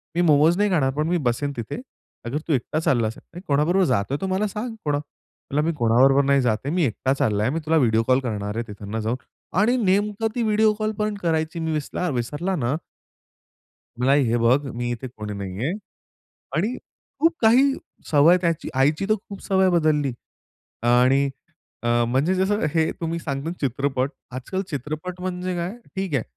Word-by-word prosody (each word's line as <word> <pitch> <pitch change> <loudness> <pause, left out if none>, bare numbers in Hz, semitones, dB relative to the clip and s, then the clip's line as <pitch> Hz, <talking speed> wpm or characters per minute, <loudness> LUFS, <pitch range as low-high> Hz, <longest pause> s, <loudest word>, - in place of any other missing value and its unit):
मी 175 - +2
मोमोज 160 +2 +4
नाही 205 0 +2
खाणार 135 -6 +2
पण 150 +3 -1
मी 175 - +2
बसेन 140 +4 -2
तिथे. 115 - -5 0.4
अगर 125 +5 -2
तू 160 - +2
एकटा 140 +4 -1
चालला 120 -8 +2
असेल. 115 - -7
अरे 175 - -8
कोणाबरोबर 165 +7 +3
जातो 125 -2 0
आहे 145 - -2
तर 190 - -1
मला 205 +3 +1
सांग 225 +4 -5
कोणा" 145 -1 +1
म्हटलं, 145 0 -6
"मी 165 - +1
कोणाबरोबर 130 +4 +4
नाही 140 0 +3
जात 115 -4 +2
आहे. 145 - -1
मी 180 - +2
एकटा 130 +3 0
चालला 105 -6 +1
आहे. 125 - +1
मी 165 - -1
तुला 160 +1 +3
व्हिडिओ 115 -5 +3
कॉल 130 +1 +4
करणार 105 -4 -3
आहे 115 - -3
तिथंन 105 +2 -6
जाऊन." 110 +3 -1 0.4
आणि 235 +4 +4
नेमकं 205 +3 +1
ती 240 - 0
व्हिडिओ 215 0 +3
कॉल 215 0 0
पण 210 0 0
करायची. 160 0 0
मी 160 0 -2
विसणार 155 +3 -2
विसरला 145 +10 -2
ना. 130 -3 0 1.2
म्हटलं, 130 +2 +2
"आई 145 0 +5
हे 115 - +2
बघ, 120 +4 +4 0.2
मी 120 0 -2
इथे 125 +2 -5
कोणी 105 -1 -5
नाही 100 +3 -4
आहे" 160 - 0 0.8
आणि 215 +10 0 0.4
खूप 330 +1 +4
काही 255 +5 +5 0.4
सवय 160 +4 +6
त्याची 170 -2 0
आईची 150 +8 +2
तर 215 - +4
खूप 200 - -9
सवय 190 -1 +3
बदलली 155 -5 +2 0.8
आणि 130 +3 +4 0.5
अ, 120 - -1 0.2
म्हणजे 140 +9 +2
जसं 195 +2 +1
हे 160 -1 +2
तुम्ही 165 0 -2
सांगता 140 -1 -4
ना - - -5
चित्रपट, 135 0 0 0.2
आज-काल 185 +9 -3
चित्रपट 155 +6 -5
म्हणजे 180 0 -3
काय, 170 +1 -2 0.3
ठीक 190 -5 -2
आहे. 130 - +2
150 Hz, 190 wpm, -23 LUFS, 130-180 Hz, 1.2 s, सवय